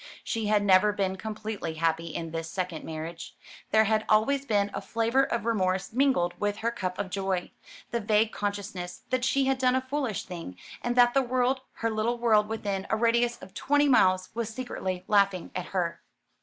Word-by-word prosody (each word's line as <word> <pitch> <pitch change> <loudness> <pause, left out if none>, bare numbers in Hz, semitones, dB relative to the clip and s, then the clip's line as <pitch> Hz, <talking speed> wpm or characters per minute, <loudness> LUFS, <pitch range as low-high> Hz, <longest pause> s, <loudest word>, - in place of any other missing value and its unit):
She 225 -2 -2
had 210 -1 +3
never 200 +1 +5
been 195 -2 -1
completely 210 -4 -5
happy 165 +1 0
in 165 0 -5
this 165 0 -4
second 180 -4 -4
marriage. 160 +1 -7 0.3
There 220 0 +5
had 220 0 +1
always 270 +6 +3
been 205 -2 +1
a - - -3
flavour 230 +3 +1
of 230 -4 -2
remorse 190 -4 0
mingled 245 -10 +2
with 205 0 -1
her 235 - +2
cup 185 -6 -4
of 200 -2 -4
joy; 190 -2 -2 0.4
the 235 - 0
vague 215 0 +2
consciousness 200 -3 -4
that 255 -1 +1
she 270 +1 +2
had 265 -1 +1
done 255 -1 +3
a 260 - +2
foolish 260 -5 -2
thing, 165 - -8 0.2
and 240 0 -1
that 245 -1 +5
the 270 - +4
world 255 +1 +1
her 230 0 -2
little 220 +2 0
world 220 -3 +3
within 200 -3 -3
a - - +2
radius 235 +1 +2
of 185 - -12
twenty 290 +1 +2
miles 185 -8 +4
was 230 -1 -2
secretly 205 -6 -4
laughing 200 -3 +2
at 180 -1 -4
her. 175 -3 -2
210 Hz, 190 wpm, -28 LUFS, 185-235 Hz, 0.4 s, never